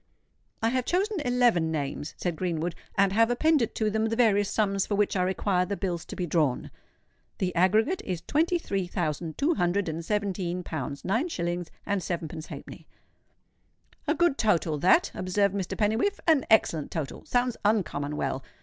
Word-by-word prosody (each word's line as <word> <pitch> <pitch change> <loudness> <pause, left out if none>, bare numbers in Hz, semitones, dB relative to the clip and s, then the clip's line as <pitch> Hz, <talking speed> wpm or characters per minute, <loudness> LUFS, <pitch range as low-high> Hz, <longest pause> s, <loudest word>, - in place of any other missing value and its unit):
"I 225 - +4
have 255 0 0
chosen 395 +2 0
eleven 245 - +2
names," 145 -1 -3
said 175 -2 -2
Greenwood; 170 0 -2 0.2
"and 195 -1 +3
have 225 +2 +4
appended 270 0 +2
to 215 -1 0
them 220 +1 +1
the 225 - -1
various 205 -4 +3
sums 200 -3 +1
for 205 - 0
which 205 0 +1
I 185 - +2
require 185 0 +1
the 200 +2 -3
bills 175 -4 -3
to - - -8
be 180 - -2
drawn. 155 -6 0 0.7
The 180 -1 -1
aggregate 215 - +3
is 175 -3 -4
twenty 330 +4 +2
three 195 - -2
thousand 165 -3 -3
two 305 +5 +2
hundred 180 - 0
and 165 +1 -3
seventeen 185 -3 -2
pounds, 140 -4 -5
nine 230 - +1
shillings, 175 - -3 0.2
and 200 -2 0
sevenpence 165 -2 -4
halfpenny." - - -10 1.2
"A 305 - +2
good 345 -5 +2
total, 170 -8 +1
that," 185 - +4
observed 195 +2 +1
Mr. 195 -3 -3
Pennywhiffe,—"an 270 - +2
excellent 165 -9 +3
total—sounds 245 - -2
uncommon 155 -9 0
well. 135 0 -2
195 Hz, 165 wpm, -27 LUFS, 170-225 Hz, 1.2 s, I